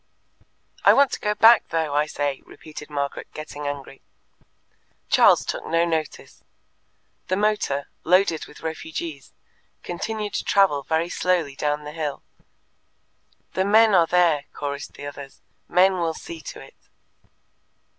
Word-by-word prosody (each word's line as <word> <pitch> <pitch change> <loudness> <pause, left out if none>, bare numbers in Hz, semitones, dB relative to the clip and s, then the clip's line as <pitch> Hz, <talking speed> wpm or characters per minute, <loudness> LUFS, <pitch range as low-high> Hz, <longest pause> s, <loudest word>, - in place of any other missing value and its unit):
"I - - +7
want 280 -1 +4
to - - -4
go 210 0 -1
back, 225 +1 +6
though, 160 -3 -1
I 150 +1 +2
say!" 145 -2 -2
repeated 150 -1 -11
Margaret, 140 -1 -3
getting 150 -1 -6
angry. 140 -1 -6 1.1
Charles - - +5
took - - -4
no 165 +1 +2
notice. 160 -3 -4 0.8
The 185 - +1
motor, 205 -9 0 0.2
loaded 180 -2 +2
with - - -15
refugees, 160 -2 -6 0.5
continued 210 +3 -4
to - - -2
travel 195 -8 +3
very 160 +4 -1
slowly 175 -7 0
down 150 +1 -1
the 150 - -7
hill. 150 -3 -4 1.3
"The 185 - +1
men 215 +2 +5
are 170 -3 +5
there," 170 -5 +3
chorused 140 -1 -5
the - - -9
others. 140 -1 -10 0.2
"Men 185 +1 +3
will 165 -2 -1
see 165 0 -9
to - - -9
it." - - -14
160 Hz, 135 wpm, -23 LUFS, 145-185 Hz, 1.3 s, I